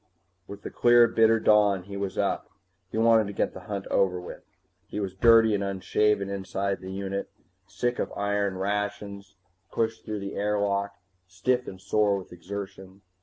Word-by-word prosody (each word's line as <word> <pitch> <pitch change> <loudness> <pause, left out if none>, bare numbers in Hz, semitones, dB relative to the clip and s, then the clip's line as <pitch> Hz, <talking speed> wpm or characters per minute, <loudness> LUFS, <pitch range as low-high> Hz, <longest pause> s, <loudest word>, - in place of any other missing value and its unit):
With 100 0 -10
the - - -6
clear 120 0 +5
bitter 115 0 +4
dawn 105 -4 +4
he 100 +2 -9
was 100 -1 -4
up. 100 - -1 0.4
He - - -5
wanted 115 -1 +4
to 100 - -6
get - - -1
the - - -8
hunt 100 -2 -3
over 90 -2 +2
with. 90 - -9 0.5
He - - -5
was 95 -3 -3
dirty 115 +2 +5
and 100 -1 0
unshaven 100 +1 +1
inside 100 0 -3
the 95 0 -7
unit, 100 0 -4 0.4
sick 120 +4 -2
of - - -2
iron 100 -1 -1
rations 100 0 -3 0.4
pushed 110 -1 -1
through 105 -2 -4
the 100 0 -5
airlock, 100 -1 0 0.3
stiff 125 +7 -1
and 95 - -8
sore 100 +1 +1
with 95 -2 -9
exertion. 95 +1 -8
100 Hz, 170 wpm, -27 LUFS, 95-105 Hz, 0.5 s, clear